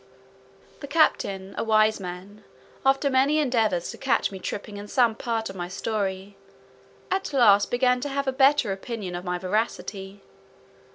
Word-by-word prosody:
The 285 - -8
captain, 200 -11 +1
a - - 0
wise 215 -1 +3
man, 190 +3 -9 0.4
after 270 +1 +3
many 275 +3 +3
endeavours 225 - +1
to - - -12
catch 265 -6 +1
me 190 - -7
tripping 205 +2 -6
in 205 0 -8
some 235 0 +3
part 225 0 -3
of 195 - -8
my 175 -1 -4
story, 195 0 -3 0.8
at 380 -3 -1
last 205 -6 +5
began 250 0 +2
to 285 - -3
have 280 0 -2
a 265 - +1
better 270 -4 +3
opinion 195 -1 -5
of 175 0 -5
my 180 0 -1
veracity. 195 0 -3
215 Hz, 160 wpm, -25 LUFS, 195-260 Hz, 0.8 s, last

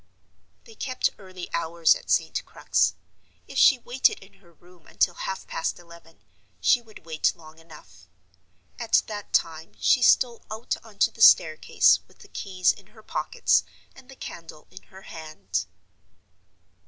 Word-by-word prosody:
They 455 - -15
kept 255 -11 -1
early 185 -2 -9
hours 170 -1 +3
at - - -10
St. - - +1
Crux. - - 0 0.5
If - - -3
she 270 - +7
waited 245 +2 +1
in 195 - -18
her 170 -3 -22
room 175 0 -22
until 175 - +1
half 190 +2 -5
past 165 - -3
eleven, 170 -1 -17 0.4
she 245 - +3
would 220 -7 -17
wait 160 +1 0
long 160 -1 -16
enough. 160 - -17 0.7
At 235 -2 +2
that 205 -2 -8
time 160 -1 -1
she 255 - +3
stole 240 -1 +3
out 220 +2 -3
on 220 -3 -16
to - - +3
the 225 - -12
staircase, 155 -7 +5
with - - -24
the - - -17
keys 185 -2 0
in 195 - -18
her 220 - -15
pocket, - - +1 0.3
and 265 -1 -17
the 270 - -12
candle 165 -9 -10
in - - -12
her 190 0 -14
hand. 130 - -5
180 Hz, 155 wpm, -25 LUFS, 160-220 Hz, 0.7 s, she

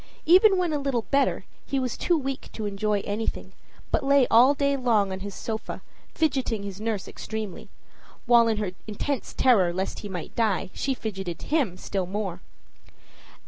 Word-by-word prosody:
Even 380 +4 +6
when 355 -3 0
a 295 - 0
little 275 -5 -1
better, 275 0 +2 0.2
he 275 - -1
was 255 -2 -2
too 345 - +1
weak 270 -2 -4
to 215 - -4
enjoy 205 0 0
anything, 210 +3 -4 0.4
but - - +1
lay 275 -1 +5
all 250 +5 +7
day 280 0 +1
long 225 -7 +2
on 190 - -4
his 200 0 -6
sofa, 220 -1 -5 0.3
fidgeting 265 -9 0
his 200 0 -7
nurse 220 -3 -2
extremely 215 -4 -6 0.6
while, 235 -2 +6
in 220 -2 +1
her 210 -3 -2 0.2
intense 240 +6 -3
terror 205 -9 +4
lest 185 +2 -3
he 205 - -7
might 180 -3 -6
die, 210 -5 0
she 270 -1 -1
fidgeted 195 -7 -5
him 270 - 0
still 190 -1 -3
more. 190 -2 -4
225 Hz, 170 wpm, -26 LUFS, 200-275 Hz, 0.6 s, all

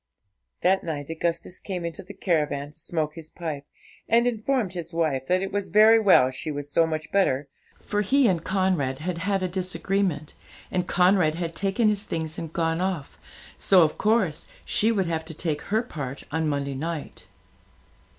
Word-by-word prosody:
That 190 +2 +3
night 150 -2 -4
Augustus 170 +2 -2
came 180 -3 -4
into 170 - -5
the 200 +2 -11
caravan 150 -6 0
to 155 - -19
smoke 160 -2 -2
his 160 -1 -9
pipe, 155 -5 -5 0.4
and 235 +1 +4
informed 235 -3 0
his 170 -2 -6
wife 140 -6 0
that 185 +1 +2
it 195 - -4
was 200 0 -2
very 220 +2 +6
well 185 -11 +5
she 130 +4 -4
was 145 -1 -4
so 165 +1 +4
much 155 -1 -4
better, 145 -8 +2 0.3
for 205 0 -1
he 265 +5 +3
and 175 -5 +1
Conrad 185 -9 0
had 170 +3 -3
had 195 +1 0
a - - +1
disagreement, 185 -3 -2 0.4
and 180 -1 -1
Conrad 180 -4 +3
had 170 -1 -3
taken 200 +6 +1
his 210 -1 +1
things 160 -4 -4
and 165 -2 -6
gone 165 0 0
off, 185 -6 -3 0.4
so 185 -3 +5
of 155 - -1
course 210 -8 +1 0.2
she 220 +2 +2
would 195 -4 +1
have 165 -1 -2
to 160 -1 -8
take 155 -2 -2
her 220 +3 +1
part 140 - -6
on 160 +1 0
Monday 140 -1 -2
night. 155 +3 -5
170 Hz, 180 wpm, -25 LUFS, 155-195 Hz, 0.4 s, very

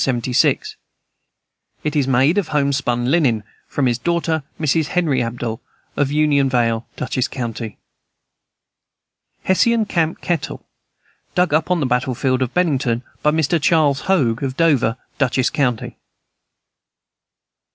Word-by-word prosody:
It 150 0 -2
is 140 -3 +2
made 135 +8 +3
of 190 - -3
homespun 140 -4 0
linen. 130 -10 +2 0.2
From 140 - -1
his 120 -1 +1
daughter, 165 0 0 0.2
Mrs. 155 0 +1
Henry 170 -8 +1
Abell, 115 -1 -4 0.3
of 145 -1 0
Union 145 -2 +2
Vale, 115 -2 0
Dutchess 130 0 -1
county. 115 -4 -5 1.7
Hessian 230 +4 +3
camp 165 -4 -1
kettle, 170 -5 -3 0.7
dug 180 -4 +2
up 155 +2 +1
on 180 -3 +1
the - - +1
battle 125 0 0
field 130 +1 0
of 130 -1 0
Bennington. 135 -9 0 0.2
By 150 - +3
Mr. 160 +1 +1
Charles 145 -3 +3
Hoag, 125 -12 +2
of 135 -2 -3
Dover, 135 -8 +2 0.2
Dutchess 130 -2 +1
county. 125 -6 -1
140 Hz, 120 wpm, -20 LUFS, 125-160 Hz, 1.7 s, made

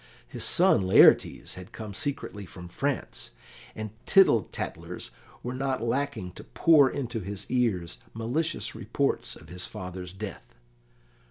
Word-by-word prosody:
His - - -4
son - - +6
Laertes 95 - +5
had 90 +4 -10
come 110 -3 -8
secretly 135 -5 -4
from 90 +1 -10
France, 140 +7 -3 0.5
and 110 -1 -5 0.2
tittle 190 - +5
tattlers - - -6 0.3
were 125 - -4
not 130 -2 -2
lacking 120 -6 -2
to - - -11
pour 150 -5 +4
into 120 -5 -4
his 100 0 -5
ears 105 -9 0 0.2
malicious 140 +9 -1
reports - - -2
of - - -15
his 90 +1 -2
father's 90 -3 -7
death. 95 -8 -9
115 Hz, 135 wpm, -27 LUFS, 95-135 Hz, 0.5 s, son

